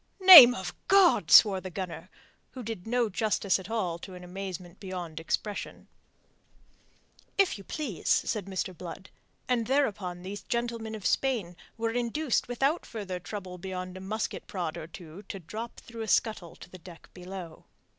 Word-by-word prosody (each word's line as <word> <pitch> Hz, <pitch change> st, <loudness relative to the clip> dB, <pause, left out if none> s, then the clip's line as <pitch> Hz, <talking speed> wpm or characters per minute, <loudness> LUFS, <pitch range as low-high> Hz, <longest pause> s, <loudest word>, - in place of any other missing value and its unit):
"Name 295 Hz, -10 st, +12 dB
of 190 Hz, -2 st, -5 dB
God!" 390 Hz, -2 st, +5 dB
swore 195 Hz, -4 st, +7 dB
the 185 Hz, -, -7 dB
gunner, 180 Hz, -1 st, -6 dB, 0.4 s
which 255 Hz, -3 st, -8 dB
did 225 Hz, -3 st, -6 dB
no 240 Hz, 0 st, +1 dB
justice 205 Hz, -1 st, 0 dB
at 190 Hz, +1 st, -10 dB
all 185 Hz, -7 st, -2 dB
to 185 Hz, +1 st, -10 dB
an 180 Hz, -, -11 dB
amazement 180 Hz, -1 st, -7 dB
beyond 180 Hz, -5 st, -6 dB
expression. 205 Hz, +5 st, -4 dB, 1.5 s
"If 390 Hz, -, +2 dB
you -, -, -11 dB
please," 260 Hz, -, -5 dB
said 210 Hz, -5 st, +1 dB
Mr. 190 Hz, -1 st, -4 dB
Blood, 180 Hz, +3 st, -9 dB, 0.4 s
and 235 Hz, -3 st, 0 dB
thereupon 205 Hz, -10 st, -1 dB
those 200 Hz, +2 st, -6 dB
gentlemen 235 Hz, -2 st, -3 dB
of 210 Hz, -, -9 dB
Spain 225 Hz, -10 st, 0 dB, 0.2 s
were 225 Hz, 0 st, -1 dB
induced 245 Hz, +4 st, -1 dB
without 270 Hz, +7 st, 0 dB
further 195 Hz, -5 st, -6 dB
trouble 180 Hz, +1 st, -7 dB
beyond 185 Hz, 0 st, -6 dB
a 185 Hz, -, -8 dB
musket 215 Hz, +3 st, -4 dB
prod 175 Hz, -5 st, -4 dB
or 155 Hz, -, -7 dB
two 165 Hz, +1 st, -11 dB
to -, -, -5 dB
drop 220 Hz, +7 st, -8 dB
through 230 Hz, -1 st, -10 dB
a 220 Hz, -, -4 dB
scuttle 210 Hz, -7 st, 0 dB
to -, -, -13 dB
the 185 Hz, -, -11 dB
deck 170 Hz, -1 st, -14 dB
below. 180 Hz, -2 st, -9 dB
195 Hz, 165 wpm, -28 LUFS, 180-230 Hz, 1.5 s, Name